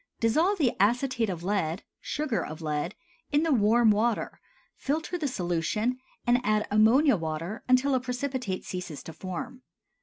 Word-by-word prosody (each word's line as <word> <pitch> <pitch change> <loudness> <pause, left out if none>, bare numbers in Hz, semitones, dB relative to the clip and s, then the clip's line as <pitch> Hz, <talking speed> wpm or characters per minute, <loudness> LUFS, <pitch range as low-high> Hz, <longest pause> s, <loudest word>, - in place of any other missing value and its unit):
Dissolve 320 - +2
the 275 -8 +2
acetate 235 +2 +2
of 170 -3 -4
lead 185 -3 -1 0.2
("sugar 295 -6 -2
of 155 - -7
lead") 150 -2 -2 0.4
in 295 +2 +3
the 325 - +1
warm 225 0 +4
water, 220 +2 0 0.3
filter 315 +5 -2
the 320 -4 -1
solution, 210 +4 -1 0.3
and 245 +1 +3
add 215 -2 +1
ammonia 230 +7 +5
water 165 +4 -4
until 255 +2 +4
a 260 - +3
precipitate 250 -5 -3
ceases 180 -5 -6
to 165 - -9
form. 240 - -6
230 Hz, 150 wpm, -28 LUFS, 185-260 Hz, 0.4 s, ammonia